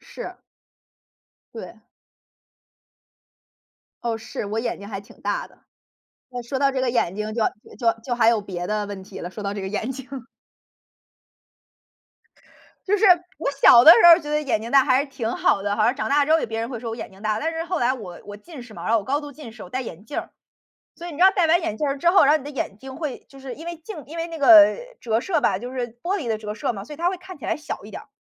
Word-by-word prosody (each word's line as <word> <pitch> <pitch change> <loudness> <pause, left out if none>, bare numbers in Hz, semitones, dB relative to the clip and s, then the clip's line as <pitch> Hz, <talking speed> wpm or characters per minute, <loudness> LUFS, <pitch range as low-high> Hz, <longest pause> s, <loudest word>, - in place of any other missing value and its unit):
是。 - - -9 1.2
对。 - - -10 2.2
哦， 235 -1 -1
是， 220 - -6
我 215 +2 -3
眼 240 - -3
睛 200 - -10
还 195 -2 -5
挺 200 - -18
大 - - -2
的。 - - -24 0.7
那 245 -1 -6
说 265 +3 -4
到 275 0 +3
这 265 - -1
个 260 -1 +1
眼 215 -7 0
睛 210 +1 -4
就 230 - 0 0.4
就 230 -2 +1
就 245 - -1
还 230 -1 +3
有 230 -2 +3
别 180 -3 -6
的 210 +1 -2
问 200 -2 -7
题 190 - -10
了， 175 - -6
说 210 +2 -8
到 200 0 -3
这 205 - -5
个 190 - -4
眼 215 +4 -3
睛。 260 -1 -10 2.8
就 410 +1 +2
是， 440 - +1 0.3
我 290 - -1
小 275 -4 +7
的 310 - +10
时 - - +6
候 340 +1 +9
觉 295 - -8
得 300 0 0
眼 250 -6 0
睛 230 +2 -7
大 275 -2 +5
还 260 -2 +3
是 285 - -3
挺 230 -4 -3
好 195 - +2
的， 205 0 -1
好 215 0 +1
像 245 +3 +2
长 - - -2
大 290 +1 +4
之 310 - +2
后 325 - +5
别 225 0 -4
人 230 - -3
会 245 -2 -5
说 230 0 -6
我 225 - -5
眼 - - -7
睛 190 +1 -17
大。 215 0 -1
但 320 - -1
是 325 0 -4
后 360 0 -2
来 250 0 +1
我 190 -9 -9
我 205 - -8
近 280 +4 -11
视 230 -3 -14
嘛， - - -9
然 - - 0
后 230 - +5
我 205 - -6
高 280 +2 0
度 290 -1 -9
近 285 -4 -11
视， 220 - -12
我 180 - -11
戴 260 - -2
眼 205 -6 -8
镜 255 - -5
儿。 - - -6 0.7
所 345 - -8
以 - - -6
你 - - -9
知 345 - +1
道 380 - +8
戴 370 -4 +2
完 335 +2 +4
眼 220 -10 -3
镜 280 0 -2
之 340 - +2
后 375 +3 +6
然 280 - +4
后 310 - +3
你 - - -12
的 290 - -6
眼 255 -8 -5
睛 265 +3 -10
会 300 -6 -4
就 275 - -15
是 265 -2 -7
因 325 - -11
为 340 0 -5
镜 330 0 -9
因 315 +5 -10
为 335 0 -3
那 330 -1 -7
个 285 - +1
呃， 315 +2 +9 0.2
折 225 -1 0
射 330 +1 0
吧， 185 - +2
就 245 +4 -7
是 250 -2 -3
玻 375 +3 -1
璃 275 - -6
的 220 - 0
折 210 -1 -6
射 220 - -2
嘛， 200 -3 -7
所 300 - -9
以 - - -13
它 340 +3 +1
会 375 - -4
看 370 -2 -11
起 - - -13
来 - - -1
小 300 -8 -7
一 210 - -11
点 - - -8
儿。 - - -22
255 Hz, 290 characters per minute, -23 LUFS, 220-305 Hz, 2.8 s, 的